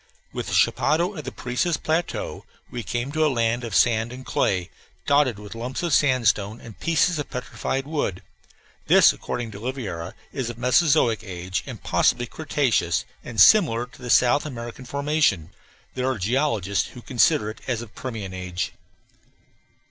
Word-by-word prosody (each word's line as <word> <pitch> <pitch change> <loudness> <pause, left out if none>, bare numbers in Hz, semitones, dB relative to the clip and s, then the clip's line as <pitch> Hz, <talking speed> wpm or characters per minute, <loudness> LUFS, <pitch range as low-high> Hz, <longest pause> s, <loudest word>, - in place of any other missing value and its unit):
With - - -4
the - - -1
chapadao 170 +6 +2
of 155 - -7
the - - -4
Parecis 125 +7 -1
plateau 160 +2 -2 0.3
we 120 - -4
came 120 +4 -3
to 155 +1 +1
a 155 - +4
land 120 -1 0
of 115 -5 -4
sand 115 -1 +3
and 130 +1 -9
clay, 90 -2 0 0.3
dotted 140 -6 +3
with 105 -1 -9
lumps 125 +7 -4
of 170 -4 0
sandstone 120 -6 +2
and 110 -6 -12
pieces 165 0 +2
of 145 - -4
petrified 135 +1 -3
wood; 145 - -2 0.6
this, - - +7
according 120 -2 -5
to 100 - -9
Oliveira, 105 -9 -5 0.2
is 130 -4 -2
of 120 - -7
Mesozoic 125 -2 +3
age, 95 -1 -4 0.2
possibly 120 0 +2
cretaceous 130 - 0 0.2
and 115 -3 -5
similar 130 - +6
to 125 - -18
the 125 - -6
South 125 +4 +4
African 120 -1 -7
formation. 140 - +1 0.4
There 130 0 -1
are 130 - -1
geologists 105 - 0
who 125 - -12
consider 125 -2 +2
it - - -14
as 120 -3 -1
of 110 - -13
Permian 110 -7 -6
age. 90 -1 -4
120 Hz, 160 wpm, -24 LUFS, 110-140 Hz, 0.6 s, this